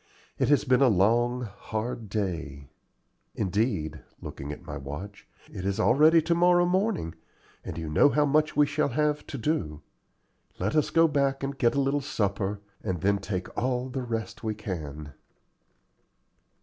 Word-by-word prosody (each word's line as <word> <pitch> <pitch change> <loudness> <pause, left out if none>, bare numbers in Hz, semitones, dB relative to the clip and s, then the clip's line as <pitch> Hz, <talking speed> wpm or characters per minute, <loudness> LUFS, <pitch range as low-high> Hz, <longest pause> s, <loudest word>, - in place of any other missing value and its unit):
It - - +2
has 145 - +4
been 130 -2 +3
a 135 - +6
long, 120 +4 +2
hard 110 +1 -5
day. 80 -9 -4 0.6
Indeed" 95 - -1 0.2
looking 70 +2 -7
at 75 - -8
my 75 - -6
watch 75 +9 -8 0.3
"it 90 - -6
is 100 0 -1
already 155 +3 +5
to 170 +2 +2
morrow 175 +1 +4
morning, 185 - 0 0.5
and - - -6
you 80 -1 -4
know 75 - +5
how 150 +1 +2
much 155 +2 +2
we 150 - +6
shall 145 +1 0
have 150 +2 0
to 140 - -5
do. 90 - -2 0.7
Let - - -1
us 155 - +2
go 165 0 +5
back 140 -2 0
and 140 +1 -2
get 120 -2 +2
a - - +2
little 140 +1 +1
supper, 100 -5 -2 0.2
and 95 -5 -2
then 100 +1 +2
take 95 -2 -5
all 125 +1 -1
the 130 +1 -3
rest 115 -2 -4
we 110 -1 -2
can." 75 -8 -6
115 Hz, 160 wpm, -27 LUFS, 95-145 Hz, 0.7 s, a